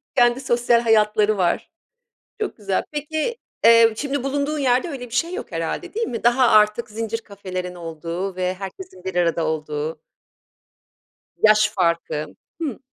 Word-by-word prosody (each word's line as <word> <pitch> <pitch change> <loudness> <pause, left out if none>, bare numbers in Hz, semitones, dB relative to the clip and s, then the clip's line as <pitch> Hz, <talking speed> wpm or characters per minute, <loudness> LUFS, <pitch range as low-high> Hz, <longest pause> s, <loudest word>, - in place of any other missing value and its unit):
Kendi 240 +1 +4
sosyal 240 -2 +3
hayatları 215 -2 +3
var. 175 -2 0 0.7
Çok 425 - -3
güzel. 195 -3 -1
Peki, 310 - -2 0.3
eee, 230 -1 +7
şimdi 285 -2 -2
bulunduğun 285 +2 -1
yerde 260 +4 +2
öyle 265 -5 -6
bir - - -12
şey 335 +7 0
yok 420 - -6
herhâlde, - - -4
değil 455 +1 -1
mi? 230 - -5
Daha, 245 +1 +4
artık, 215 +2 +4
zincir 225 +1 -3
kafelerin 185 -3 -6
olduğu 170 +3 -5
ve 185 0 -1
herkesin 195 - -9
bir 190 -1 -5
arada 170 -2 +1
olduğu. 155 0 -3 1.4
Yaş 215 -1 +5
farkı. 170 -4 0 0.4
Hıı. 285 -8 -3
215 Hz, 145 wpm, -22 LUFS, 185-255 Hz, 1.4 s, eee